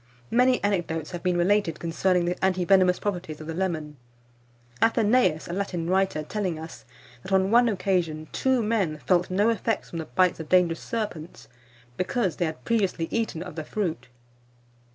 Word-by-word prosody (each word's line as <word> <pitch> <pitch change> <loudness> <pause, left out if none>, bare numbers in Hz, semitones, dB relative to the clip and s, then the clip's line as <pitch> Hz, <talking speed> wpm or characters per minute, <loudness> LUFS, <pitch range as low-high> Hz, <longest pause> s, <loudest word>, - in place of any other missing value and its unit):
Many 250 0 +3
anecdotes 170 -6 -1
have 175 -2 -5
been 180 -1 +1
related 175 -2 +1
concerning 175 +2 +1
the 175 +2 -3
anti 185 -1 +2
venomous 185 -1 +4
properties 175 -6 -4
of 155 - -8
the 165 - -5
lemon; 160 -5 -3 0.8
Athenaeus, 220 -7 +3
a 170 - -5
Latin 180 -3 -3
writer, 190 -4 +1
telling 185 -1 -3
us, 160 +1 -10 0.4
that 190 - -9
on 190 +1 +3
one 240 +1 +5
occasion, 180 -6 -1
two 260 -3 +1
men 205 -8 0
felt 180 -1 +2
no 200 +4 +2
effects 225 0 -2
from 165 - -4
the 160 - -4
bites 180 +2 +1
of 160 - -7
dangerous 175 -2 +3
serpents, 170 - -5 0.5
because 185 0 -1
they 175 - +1
had 160 -1 -6
previously 195 -7 0
eaten 220 -8 -2
of 180 - -9
this 155 -2 -6
fruit. 165 - -3
180 Hz, 170 wpm, -26 LUFS, 165-205 Hz, 0.8 s, one